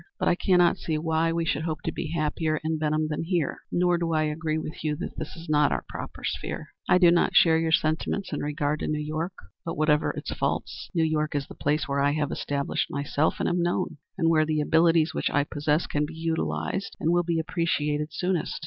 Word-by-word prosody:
But - - -1
I - - +5
cannot 175 -1 +3
see 155 -2 -1
why 160 +1 +1
we 165 0 0
should 150 -1 0
hope 160 -1 -3
to - - -1
be 160 - -4
happier 155 -1 0
in 160 0 -1
Benham 155 0 +1
than 150 -1 -2
here, 165 -3 -1
nor 175 -1 +2
do 165 -1 -1
I 155 0 +2
agree 155 +1 -1
with 155 -1 -6
you 150 -1 0
that - - -6
this - - -6
is 165 0 -10
not 150 -2 +3
our - - -2
proper - - -8
sphere. - - -4 0.2
I - - +6
do 175 -2 +6
not 170 - +2
share 160 -1 +6
your 165 0 0
sentiments 160 +4 0
in 145 - -1
regard 150 0 -1
to - - -3
New 150 - 0
York; 155 +4 -3 0.3
but 165 - -4
whatever 150 -1 +3
its - - -5
faults, - - -3
New 165 - +3
York 155 -1 0
is 140 -1 0
the - - -11
place 150 +2 0
where 140 0 0
I 140 +1 +3
have 150 -1 -1
established 140 -1 -2
myself 140 +2 0
and - - 0
am 175 0 +1
known, 175 -2 -1 0.2
and 165 -3 +2
where 160 -1 +4
the 155 0 0
abilities 160 +1 +3
which - - 0
I 145 - +2
possess 150 +2 0
can 150 0 -1
be 160 - -9
utilized 165 +4 -2
and 165 - +1
will 175 0 +4
be 170 -1 -1
appreciated 155 -3 -1
soonest. 180 0 -1
155 Hz, 230 wpm, -26 LUFS, 150-165 Hz, 0.3 s, I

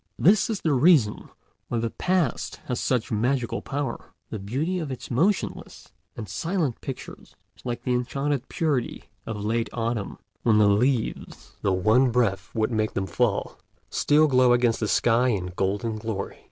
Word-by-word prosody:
This 195 +6 +4
is 215 -3 -2
the 155 - +1
reason 135 -6 +3 0.4
why 120 - -2
the 115 0 -1
Past 180 -8 0
has 125 - -2
such 125 -4 0
magical 120 +3 0
power. 140 -3 -5 0.2
The 110 - -4
beauty 140 - -2
of 155 -5 -4
its 130 - -7
motionless 180 - -1 0.2
and 110 -3 -6
silent 165 - -2
pictures 135 - -8 0.2
is - - -22
like 120 -1 -3
the 125 - 0
enchanted 135 +2 -1
purity 145 -10 -2 0.2
of 105 -2 -4
late 115 +1 0
autumn, 115 -3 -2 0.2
when 110 -3 +3
the 105 - +5
leaves, 120 +3 -1
though 95 - +1
one 110 +8 +3
breath 105 -5 0
would 110 +1 +1
make 110 -1 -1
them 95 - 0
fall, 90 - -1 0.3
still 150 +1 +4
glow 130 -4 +4
against 120 -2 +2
the 110 - -1
sky 120 +4 +3
in 95 -7 -1
golden 100 +4 -1
glory. 105 -3 -5
120 Hz, 165 wpm, -25 LUFS, 110-140 Hz, 0.4 s, the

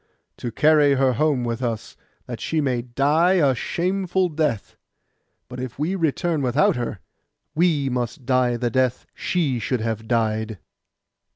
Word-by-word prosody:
'To 120 - -5
carry 150 +2 +4
her 130 -1 +2
home 140 0 +1
with 120 0 -3
us, 115 -3 -3 0.3
that - - -6
she 160 - -1
may 130 -5 0
die 145 +9 +2
a 145 -8 +3
shameful 185 +6 -1
death; 150 -9 -2 0.7
but 125 - -8
if 125 -1 -6
we 155 +6 -1
return 165 -2 0
without 130 +3 +2
her, 120 -3 -3 0.6
we 155 -3 +2
must 125 0 -3
die 125 -1 +2
the 120 0 -1
death 130 0 0
she 150 -9 -1
should 125 0 -1
have 110 -1 -3
died. 110 -2 0
130 Hz, 150 wpm, -23 LUFS, 120-155 Hz, 0.7 s, carry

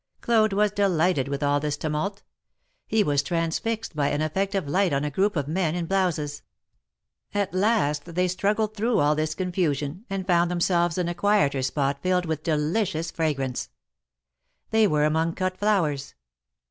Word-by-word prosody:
Claude 220 -3 +3
was 205 +1 +2
delighted 180 -7 +1
with 140 +1 -3
all 145 0 +2
this 145 0 -2
tumult. 160 +7 -3 0.6
He 220 -1 +2
was 145 -4 +2
transfixed 170 +7 -2
by 145 -2 +1
an 145 - -1
effect 190 +6 -1
of 190 -7 -1
light 180 +2 +1
on 140 +1 0
a 150 - -2
group 195 +6 +1
of 145 -3 -1
men 165 0 0
in 175 -1 -2
blouses. 165 -6 -1 0.9
At 200 -2 0
last 185 -7 +1
they 180 +1 +2
struggled 210 +4 0
through 225 +3 +1
all 145 +1 +3
this 155 0 -1
confu 180 -5 0
sion, 145 - -6
and 195 -1 -3
found 175 -2 +3
themselves 175 -1 +1
in 180 -2 0
a 175 - -1
quieter 175 -7 +2
spot 140 +1 -1
filled 180 -1 +1
with 160 -2 -2
delicious 160 +2 -1
fragrance. 135 -6 -2 1.0
They 220 -1 +4
were 150 -4 +2
among 160 +2 +1
cut 185 -1 -1
flowers. 165 -10 0
170 Hz, 170 wpm, -25 LUFS, 150-195 Hz, 1.0 s, They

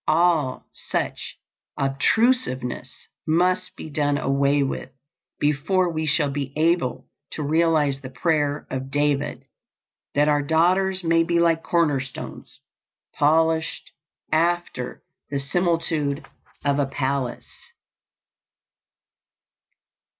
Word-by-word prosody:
All 160 -4 +2
such - - -4 0.4
obtrusiveness 135 - 0 0.2
must 180 +3 +1
be - - -8
done 145 -1 +1
away 140 0 +2
with 135 - -4 0.5
before 160 +6 +1
we 155 0 -2
shall 150 -1 +2
be 140 -1 -3
able 160 -4 +1 0.3
to 155 - -3
realize 155 -2 +2
the 130 - -7
prayer 145 +2 0
of 130 0 -4
David, 145 0 0 0.7
"that 145 +1 +4
our 145 -1 +3
daughters 185 +5 +2
may 165 0 +3
be 170 0 +1
like 165 -1 +3
corner 165 -5 +2
stones, 130 -1 -8 0.5
polished 160 +2 +1 0.4
after 165 -5 0 0.3
the 140 - -2
similitude 160 -1 0 0.4
of 140 0 +2
a 140 - +1
palace." 135 -2 -4
150 Hz, 100 wpm, -23 LUFS, 140-165 Hz, 0.7 s, that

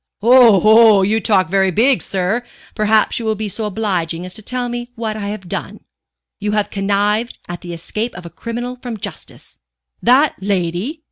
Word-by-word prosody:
"Oho, 220 -3 +6
you 215 +3 +1
talk 195 -5 +2
very 190 +2 +2
big, 240 +8 +3
sir. 195 +5 -1 0.3
Perhaps 215 +1 +2
you 230 - -5
will 220 0 0
be 215 0 -4
so 215 +2 -3
obliging 180 -5 -2
as 185 - -5
to 220 - -6
tell 250 +3 -3
me 240 0 -5
what 225 -2 -3
I 205 -2 -4
have 205 -3 -6
done." - - -5 0.6
"You 210 0 -2
have 210 -1 0
connived 205 +3 0
at 175 0 -7
the 175 - -8
escape 210 +8 -4
of 175 0 -10
a 170 - -9
criminal 240 +2 -6
from 240 -3 -5
justice - - -9 0.2
" 60 0 -53
"That 280 +4 +4
lady? 190 - -2
210 Hz, 185 wpm, -18 LUFS, 190-230 Hz, 0.6 s, Oho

